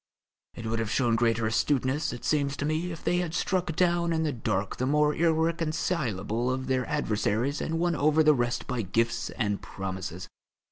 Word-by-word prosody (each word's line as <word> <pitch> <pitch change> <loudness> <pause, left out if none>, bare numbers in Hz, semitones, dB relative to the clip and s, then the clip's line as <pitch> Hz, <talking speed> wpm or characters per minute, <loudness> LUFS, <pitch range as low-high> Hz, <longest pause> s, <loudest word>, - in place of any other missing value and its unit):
It 115 - -7
would 115 0 -1
have 115 -2 -2
shown 120 0 +2
greater 115 -1 +2
astuteness, 130 +5 +1
it 120 - -7
seems 145 -2 +1
to 145 - -2
me, 160 +4 -1
if 165 - -8
they 175 - +1
had 175 -2 -2
struck 180 -4 0
down 170 -1 +2
in 160 0 +1
the 155 - 0
dark 100 -4 -2
the 130 - -1
more 150 +1 +3
irreconcilable 155 - 0
of 130 0 -2
their 130 -2 0
adversaries 120 -1 0
and 165 - -1
won 170 0 +1
over 155 +2 +3
the 155 0 +6
rest 120 -2 -1
by 125 -3 -2
gifts 115 +3 0
and 105 -3 -2
promises. 95 -2 -6
135 Hz, 185 wpm, -28 LUFS, 115-160 Hz, -, the